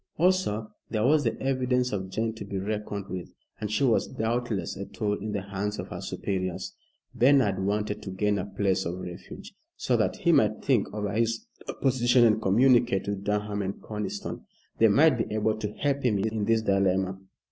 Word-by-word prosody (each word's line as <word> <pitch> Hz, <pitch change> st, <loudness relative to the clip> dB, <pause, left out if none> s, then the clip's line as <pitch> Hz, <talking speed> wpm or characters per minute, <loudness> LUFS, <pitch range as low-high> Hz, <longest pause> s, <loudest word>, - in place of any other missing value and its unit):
Also, 175 Hz, -, +1 dB, 0.2 s
there 110 Hz, 0 st, 0 dB
was 150 Hz, +2 st, +4 dB
the 115 Hz, -, -1 dB
evidence 125 Hz, -1 st, +1 dB
of 95 Hz, -2 st, -3 dB
Jane 110 Hz, +3 st, -1 dB
to 110 Hz, -, -8 dB
be 100 Hz, -1 st, -5 dB
reckoned 105 Hz, 0 st, -3 dB
with, 90 Hz, -2 st, -7 dB, 0.2 s
and 105 Hz, -, -3 dB
she 110 Hz, +7 st, 0 dB
was 120 Hz, -5 st, +3 dB
doubtless 110 Hz, -5 st, -2 dB
a 100 Hz, 0 st, -6 dB
tool 105 Hz, -2 st, -2 dB
in 105 Hz, +1 st, -4 dB
the 100 Hz, -2 st, -2 dB
hands 100 Hz, +1 st, -3 dB
of -, -, -6 dB
her -, -, -6 dB
superiors. 95 Hz, -2 st, -3 dB, 0.4 s
Bernard 125 Hz, -7 st, +3 dB
wanted 105 Hz, +1 st, -1 dB
to 105 Hz, -, -7 dB
gain 100 Hz, +2 st, 0 dB
a 90 Hz, -, -4 dB
place 95 Hz, -1 st, 0 dB
of 85 Hz, +2 st, -3 dB
refuge, 90 Hz, -1 st, -9 dB, 0.2 s
so -, -, +1 dB
that -, -, +1 dB
he -, -, +2 dB
might -, -, +3 dB
think -, -, +2 dB
over 105 Hz, -1 st, -3 dB
his 115 Hz, +1 st, 0 dB, 0.4 s
position 125 Hz, -2 st, +4 dB
and 110 Hz, -1 st, +3 dB
communicate 120 Hz, 0 st, +3 dB
with 100 Hz, -1 st, -3 dB
Durham 105 Hz, 0 st, -1 dB
and 95 Hz, 0 st, -4 dB
Conniston. 105 Hz, -1 st, -5 dB, 0.3 s
They 115 Hz, -, +7 dB
might 135 Hz, +5 st, +5 dB
be 110 Hz, -, -2 dB
able 110 Hz, 0 st, 0 dB
to 105 Hz, -1 st, -3 dB
help 140 Hz, +2 st, -1 dB
him 115 Hz, -6 st, +2 dB
in 110 Hz, +1 st, -1 dB
this 115 Hz, 0 st, +2 dB
dilemma. 95 Hz, -2 st, +1 dB
105 Hz, 190 wpm, -27 LUFS, 100-115 Hz, 0.4 s, They